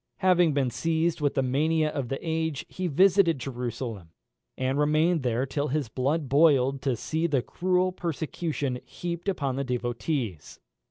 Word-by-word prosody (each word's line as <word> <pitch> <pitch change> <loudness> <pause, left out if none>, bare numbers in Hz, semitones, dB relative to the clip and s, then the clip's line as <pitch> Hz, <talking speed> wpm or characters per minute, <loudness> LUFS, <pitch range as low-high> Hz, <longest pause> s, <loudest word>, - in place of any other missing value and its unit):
Having 175 -5 +4
been 135 -3 +1
seized 165 +5 0
with 145 -1 +1
the 135 - +2
mania 155 +4 +1
of 140 -4 -3
the 135 - -2
age, 160 -3 -1
he 185 -1 -4
visited 175 0 +4
Jerusalem, 120 -7 -5 0.5
and 130 +2 0
remained 155 +3 +3
there 125 0 0
till 145 +2 -2
his 140 -3 -1
blood 140 +6 -1
boiled 140 -2 +4
to 135 -2 0
see 160 +8 -1
the 140 -6 +1
cruel 185 +3 +1
persecution 160 -5 -3
heaped 175 +2 -4
upon 140 -8 -1
the 140 - 0
devotees. 120 - -3
145 Hz, 155 wpm, -27 LUFS, 130-165 Hz, 0.5 s, Having